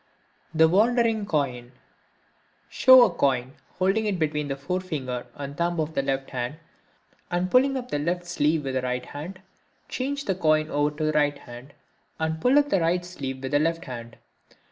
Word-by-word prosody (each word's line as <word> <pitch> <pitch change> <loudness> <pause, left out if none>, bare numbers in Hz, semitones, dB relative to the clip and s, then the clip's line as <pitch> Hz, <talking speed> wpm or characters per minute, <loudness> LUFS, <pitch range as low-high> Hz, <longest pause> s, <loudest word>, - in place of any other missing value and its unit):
The 160 0 +5
Wandering 220 +3 +2
Coin.—Show 140 - +1
a 235 - +3
coin, 130 -1 0 0.2
holding 195 +4 +1
it 200 -3 0
between 150 -2 -1
the 135 - -2
forefinger 140 -5 -4
and 140 0 -7
thumb 170 +1 -1
of 155 0 -2
the 135 - +1
left 135 0 -2
hand, 125 +2 -3 0.7
and 180 +1 -1
pulling 270 +2 +4
up 250 -1 -7
the 145 - 0
left 175 +4 -2
sleeve 155 -2 0
with 135 -1 -3
the 130 - 0
right 125 0 -3
hand. 180 +6 -8 0.5
Change 280 +2 -3
the 195 - +1
coin 155 -3 +1
over 145 0 +2
to 155 - -2
the 155 - +2
right 145 -1 +1
hand, 120 +2 -12 0.4
and 160 0 -2
pull 255 +3 +4
up 290 0 +3
the 195 - +3
right 175 +2 +1
sleeve 135 -7 -6
with 130 - -4
the 145 - +3
left 165 +2 -1
hand. 120 -3 -8
155 Hz, 180 wpm, -25 LUFS, 135-185 Hz, 0.7 s, The